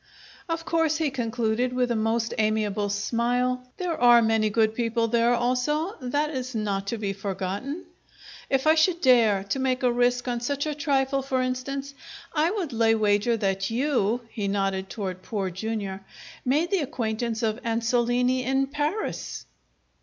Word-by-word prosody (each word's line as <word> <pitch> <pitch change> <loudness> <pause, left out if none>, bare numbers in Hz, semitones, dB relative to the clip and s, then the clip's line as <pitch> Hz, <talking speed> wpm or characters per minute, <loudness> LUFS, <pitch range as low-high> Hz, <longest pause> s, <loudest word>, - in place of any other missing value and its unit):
"Of 330 0 -2
course," 325 -2 +1
he 315 -3 0
concluded, 240 0 -1
with 250 -1 +1
a - - +1
most 225 +1 0
amiable 215 -1 +1
smile, 245 +4 0
"there 355 -3 -2
are 240 -1 +8
many 220 -1 +2
good 220 +1 +2
people 230 0 0
there 235 +1 +3
also. 275 - 0
That 290 +4 0
is 255 -3 -4
not 200 -2 -2
to 230 - -2
be 200 -2 -2
forgotten. 200 - -4 0.6
If 270 0 +1
I 310 - +6
should 335 +2 +3
dare 230 - +4
to 270 - 0
make 260 0 0
a 250 - +4
risk 245 +1 +1
on 240 -1 -1
such 280 +4 -1
a 305 - -1
trifle, 275 -2 +1
for 265 -1 -1
instance, 275 +2 -3 0.4
I 315 +1 +2
would 360 - -3
lay 225 0 +3
wager 215 +2 +2
that 195 -2 -1
you" 245 -2 +1
he 205 -3 -3
nodded 195 -1 -1
toward 185 -4 -5
Poor 195 -1 -3
Jr. 200 0 -3 0.5
"made 300 +8 +1
the 390 - +3
acquaintance 235 -4 -2
of 220 +1 0
Ansolini 245 +2 +1
in 270 +2 +1
Paris?" 295 +9 -3
240 Hz, 160 wpm, -26 LUFS, 220-270 Hz, 0.6 s, are